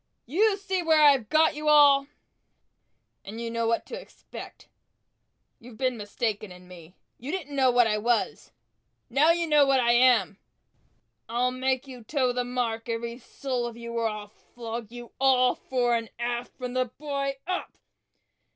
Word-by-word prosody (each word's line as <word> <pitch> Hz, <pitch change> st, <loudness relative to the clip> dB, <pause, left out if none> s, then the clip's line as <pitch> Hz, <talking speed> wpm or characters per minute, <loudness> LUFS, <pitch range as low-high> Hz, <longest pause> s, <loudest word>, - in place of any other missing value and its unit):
You 395 Hz, -, +2 dB
see 385 Hz, -2 st, -2 dB
where 320 Hz, -2 st, +3 dB
I've 270 Hz, -7 st, +5 dB
got 315 Hz, +1 st, +4 dB
you 300 Hz, +1 st, -5 dB
all, 285 Hz, -2 st, +6 dB, 1.2 s
and 215 Hz, +3 st, -8 dB
you 230 Hz, 0 st, -4 dB
know 230 Hz, 0 st, -1 dB
what 230 Hz, 0 st, 0 dB
to 485 Hz, -, -7 dB
expect!" -, -, -12 dB, 0.9 s
"You've 235 Hz, -1 st, -14 dB
been 255 Hz, 0 st, 0 dB
mistaken 210 Hz, -1 st, -3 dB
in 180 Hz, 0 st, -14 dB
me 175 Hz, -1 st, -14 dB, 0.2 s
you 260 Hz, +5 st, -6 dB
didn't 305 Hz, -6 st, -5 dB
know 265 Hz, -2 st, +4 dB
what 245 Hz, -1 st, +4 dB
I 210 Hz, -1 st, 0 dB
was! 225 Hz, -8 st, -1 dB, 0.6 s
Now 285 Hz, +6 st, +4 dB
you 335 Hz, 0 st, +2 dB
know 300 Hz, -2 st, +5 dB
what 275 Hz, -1 st, +3 dB
I 235 Hz, -1 st, +3 dB
am!" 240 Hz, -5 st, +3 dB, 0.9 s
"I'll 245 Hz, +2 st, 0 dB
make 260 Hz, +1 st, -1 dB
you 250 Hz, -3 st, -10 dB
toe 255 Hz, 0 st, 0 dB
the 250 Hz, 0 st, -1 dB
mark, 240 Hz, -2 st, -3 dB
every 235 Hz, +1 st, -4 dB
soul 250 Hz, -1 st, -4 dB
of 235 Hz, -1 st, -9 dB
you, 235 Hz, 0 st, -7 dB
or 230 Hz, -1 st, 0 dB
I'll 210 Hz, -1 st, -6 dB
flog 230 Hz, 0 st, -8 dB
you 240 Hz, -1 st, -10 dB
all, 255 Hz, -2 st, +4 dB
fore 245 Hz, -2 st, -1 dB
and 230 Hz, -1 st, -3 dB
aft, 240 Hz, +1 st, -4 dB
from 250 Hz, -1 st, -5 dB
the 255 Hz, 0 st, +1 dB
boy, 275 Hz, +2 st, -4 dB
up!" 365 Hz, 0 st, -4 dB
245 Hz, 170 wpm, -26 LUFS, 230-275 Hz, 1.2 s, all